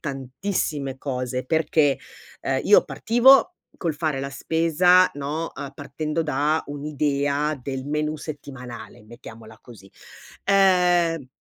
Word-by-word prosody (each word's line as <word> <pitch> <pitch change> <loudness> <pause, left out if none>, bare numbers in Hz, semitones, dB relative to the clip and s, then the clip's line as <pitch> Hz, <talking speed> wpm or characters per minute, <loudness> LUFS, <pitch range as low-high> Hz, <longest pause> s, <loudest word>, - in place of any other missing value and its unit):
tantissime 140 0 -3
cose, 125 -2 -4
perché, 155 -1 +2 0.4
ehm, - - -1
io - - +6
partivo 260 +8 +4 0.2
col 165 -4 -2
fare 150 -3 -2
la 140 - -4
spesa, 165 +5 +3
no, 150 +4 -4
ehm, 140 -2 -7
partendo 155 +4 -3
da 150 +1 0
un'idea 145 0 -1
del 135 0 -5
menù 150 +1 -2
settimanale, 125 -8 -9
mettiamola 110 -1 -13
così. 100 -5 -15 0.5
Ehm, 180 -6 +3
145 Hz, 110 wpm, -23 LUFS, 135-165 Hz, 0.5 s, io